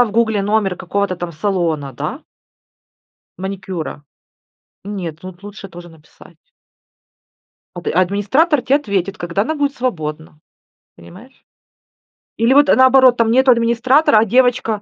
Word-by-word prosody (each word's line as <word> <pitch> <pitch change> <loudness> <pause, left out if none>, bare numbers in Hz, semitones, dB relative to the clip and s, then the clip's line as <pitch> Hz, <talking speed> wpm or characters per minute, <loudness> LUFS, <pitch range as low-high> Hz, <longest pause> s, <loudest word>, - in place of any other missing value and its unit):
нашла 245 - +6
в 215 - -6
"Гугле" 220 -3 +1
номер 205 -3 0
какого-то 190 0 -3
там 175 -1 -6
салона, 160 -6 -2
да - - -6 1.2
маникюра. 190 -6 -6 0.8
Нет, 180 -6 -6
тут 185 0 -11
лучше 205 -1 -10
тоже 175 0 -12
написать. 160 -2 -19 1.4
Ад 175 - -8
администратор 205 - +1
те 260 +2 +1
ответит, 200 - -2
когда 175 +4 -2
она 315 +6 -3
будет 285 -1 -1
свободна, 155 -11 -5 0.6
понимаешь? 195 - -16 0.9
Или 230 +3 +2
вот 285 +1 +5
наоборот, 260 -2 +5
там 230 -1 +2
нету 260 +1 +4
администратора, 235 +3 +3
а 215 - +4
девочка, 240 -2 +1
205 Hz, 125 wpm, -17 LUFS, 175-245 Hz, 1.4 s, нашла